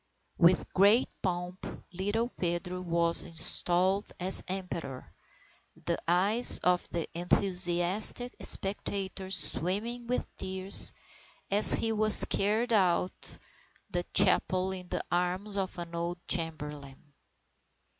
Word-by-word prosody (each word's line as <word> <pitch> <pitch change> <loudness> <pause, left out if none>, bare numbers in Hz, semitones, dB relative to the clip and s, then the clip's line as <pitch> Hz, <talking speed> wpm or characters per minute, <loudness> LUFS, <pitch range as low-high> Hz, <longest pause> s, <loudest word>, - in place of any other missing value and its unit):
With 175 0 +2
great 205 +6 +3
pomp, 180 0 -5 0.3
little 205 +6 -3
Pedro 180 -2 -5
was 170 -1 +2
installed 180 +4 -1
as 185 +2 -1
Emperor, 170 -8 -8 0.7
the - - -2
eyes 200 +8 +4
of 180 0 0
the 170 -2 -5
enthusiastic 180 +6 +2
spectators 195 -1 -1
swimming 210 +9 -3
with 250 - -3
tears, 190 +1 +1 0.6
as 205 +2 +6
he 225 - -2
was 215 0 +9
carried 220 +4 -2
out 180 -3 +1
of - - -8 0.5
the 175 -1 -2
chapel 185 +1 +2
in 185 -1 -8
the - - -4
arms 180 +4 -3
of 190 -2 -4
an 170 -1 -8
old 170 +1 -5
chamberlain. 150 -4 -4
185 Hz, 110 wpm, -28 LUFS, 175-200 Hz, 0.7 s, was